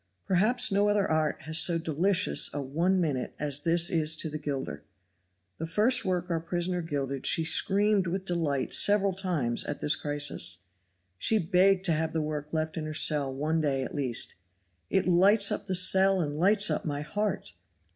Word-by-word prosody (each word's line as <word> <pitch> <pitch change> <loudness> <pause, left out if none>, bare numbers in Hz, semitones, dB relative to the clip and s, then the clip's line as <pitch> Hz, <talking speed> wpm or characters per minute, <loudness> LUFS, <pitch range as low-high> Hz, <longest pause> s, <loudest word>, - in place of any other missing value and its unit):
Perhaps 215 +7 +1
no 200 +1 +2
other 205 -1 +1
art 155 -1 -1
has 160 +1 +1
so 170 0 +2
delicious 170 +4 +2
a - - -2
one 170 +8 0
minute 145 -7 -3
as 145 -1 -2
this 170 +3 +2
is 160 -2 +2
to 155 0 -2
the 155 - -5
gilder. 140 -3 -5 0.8
The 165 - -4
first 220 +9 +1
work 180 -1 -2
our 165 - 0
prisoner 175 +2 -3
gilded 140 -4 -3
she 165 - +3
screamed 200 +2 +2
with 185 +2 -4
delight 160 -7 -1
several 200 -1 +2
times 170 -11 -1
at 145 - -5
this 150 - +2
crisis. 145 - 0 0.6
She 220 - +3
begged 185 +1 +2
to 170 - +2
have 160 +1 -2
the 160 - -1
work 150 0 -5
left 160 0 -3
in 155 - -4
her 155 0 -6
cell 145 -3 +1
one 155 +4 -2
day 135 -3 -1
at - - -7
least. 130 -6 0 0.6
"It 190 - 0
lights 200 +4 +3
up 205 - -4
the 190 - -2
cell 190 +1 +4
and 145 -4 -3
lights 200 +3 +3
up - - -2
my 145 -2 -4
heart." 195 - -4
165 Hz, 185 wpm, -27 LUFS, 150-190 Hz, 0.8 s, cell